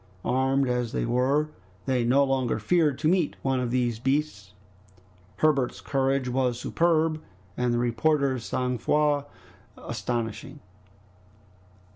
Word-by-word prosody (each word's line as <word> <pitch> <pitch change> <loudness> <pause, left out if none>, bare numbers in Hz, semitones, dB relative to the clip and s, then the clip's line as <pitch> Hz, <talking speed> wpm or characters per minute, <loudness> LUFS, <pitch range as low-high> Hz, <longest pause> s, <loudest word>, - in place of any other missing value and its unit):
Armed 135 +1 +1
as 125 -2 -1
they - - -1
were, 130 +5 +1 0.4
they 130 -3 +1
no 130 +4 +4
longer 135 -3 0
feared 150 +4 +2
to - - 0
meet 175 -2 +2
one 135 -1 +1
of 125 -1 -1
those 120 -2 0
beasts. 135 -7 -2 0.8
Herbert's 140 -5 +1
courage 135 -1 0
was 125 -1 0
superb, 160 +1 +1 0.3
and 125 -1 0
the 120 - +1
reporter's 130 +2 +1
sang 125 0 -2
froid 145 +2 +1 0.5
astonishing. 115 +4 -4
130 Hz, 120 wpm, -26 LUFS, 125-145 Hz, 0.8 s, no